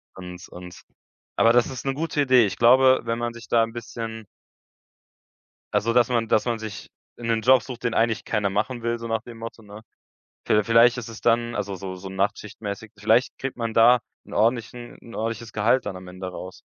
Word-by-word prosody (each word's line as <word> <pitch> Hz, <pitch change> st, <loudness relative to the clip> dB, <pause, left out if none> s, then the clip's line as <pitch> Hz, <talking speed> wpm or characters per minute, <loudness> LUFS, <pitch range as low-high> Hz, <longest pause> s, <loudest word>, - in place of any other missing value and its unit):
Und 90 Hz, -1 st, -9 dB
und 90 Hz, 0 st, -11 dB, 0.5 s
aber 115 Hz, -, +5 dB
das 120 Hz, 0 st, +4 dB
ist 130 Hz, 0 st, -7 dB
'ne 135 Hz, -, 0 dB
gute 155 Hz, 0 st, -1 dB
Idee. 130 Hz, -4 st, +5 dB
Ich 95 Hz, -3 st, -3 dB
glaube, 130 Hz, +4 st, +5 dB
wenn 115 Hz, 0 st, -2 dB
man 120 Hz, 0 st, -2 dB
sich 115 Hz, -1 st, -12 dB
da 115 Hz, -, +4 dB
'n 115 Hz, 0 st, -1 dB
bisschen 115 Hz, -1 st, -6 dB, 1.5 s
also, 115 Hz, +2 st, +1 dB
dass 120 Hz, -1 st, +4 dB
man 115 Hz, -2 st, 0 dB
dass 105 Hz, -, +3 dB
man 120 Hz, -2 st, -1 dB
sich 110 Hz, -2 st, -8 dB, 0.3 s
'nen 115 Hz, -2 st, -1 dB
Job 130 Hz, -1 st, +5 dB
sucht, 125 Hz, 0 st, -9 dB
den 115 Hz, -, 0 dB
eigentlich 115 Hz, -1 st, +1 dB
keiner 100 Hz, -2 st, 0 dB
machen 115 Hz, +4 st, -2 dB
will, 120 Hz, 0 st, -1 dB
so 115 Hz, 0 st, -6 dB
nach 115 Hz, 0 st, -1 dB
dem 115 Hz, -1 st, -11 dB
Motto, 115 Hz, 0 st, -8 dB
ne? 105 Hz, +1 st, -12 dB, 0.6 s
Viel 105 Hz, 0 st, +3 dB
vielleicht 115 Hz, +2 st, +5 dB
ist 115 Hz, -1 st, -6 dB
es 110 Hz, -, -10 dB
dann 120 Hz, 0 st, +1 dB
also, 100 Hz, -1 st, -3 dB
so 95 Hz, 0 st, -6 dB
so 95 Hz, +1 st, -8 dB
Nachtschichtmäßig. 100 Hz, +2 st, -4 dB
Vielleicht 110 Hz, +4 st, +2 dB
kriegt 135 Hz, -1 st, -5 dB
man 115 Hz, -1 st, -3 dB
da 120 Hz, +2 st, +6 dB, 0.3 s
'n -, -, -12 dB
ordentlichen 120 Hz, +2 st, -1 dB
'n 115 Hz, -, -12 dB
ordentliches 115 Hz, +1 st, -4 dB
Gehalt 115 Hz, +5 st, +2 dB
dann 95 Hz, -, -4 dB
am 90 Hz, 0 st, -10 dB
Ende 95 Hz, +1 st, -7 dB
raus. 90 Hz, +1 st, -9 dB
115 Hz, 205 wpm, -24 LUFS, 105-120 Hz, 1.5 s, da